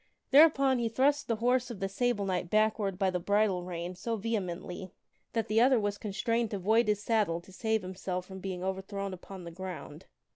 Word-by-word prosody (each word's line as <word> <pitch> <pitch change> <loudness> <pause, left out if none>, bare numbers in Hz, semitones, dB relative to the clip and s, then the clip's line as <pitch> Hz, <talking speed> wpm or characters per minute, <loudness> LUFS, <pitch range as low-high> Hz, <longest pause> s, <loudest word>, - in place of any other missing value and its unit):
Thereupon 275 -3 +6
he 230 -1 0
thrust 280 +5 +2
the 230 - +1
horse 245 +3 +1
of 230 -5 -7
the 195 - -1
Sable 205 +1 0
Knight 180 -2 -1
backward 215 -2 +1
by 190 -1 +2
the 180 - -1
bridle 200 0 +1
rein 175 0 -5
so 225 +6 -3
vehemently, 190 -4 -3 0.4
that 225 -2 0
the 220 +2 +3
other 255 0 +5
was 205 -1 -2
constrained 225 +3 -1
to 205 - -3
void 220 +5 +3
his 210 0 +1
saddle 210 -8 +1
to 175 - -16
save 220 +1 0
himself 185 0 -4
from 190 0 -9
being 185 -1 -5
overthrown 190 +1 -3
upon 185 +1 -9
the 170 - -8
ground. 180 -2 -8
200 Hz, 195 wpm, -30 LUFS, 185-230 Hz, 0.4 s, Thereupon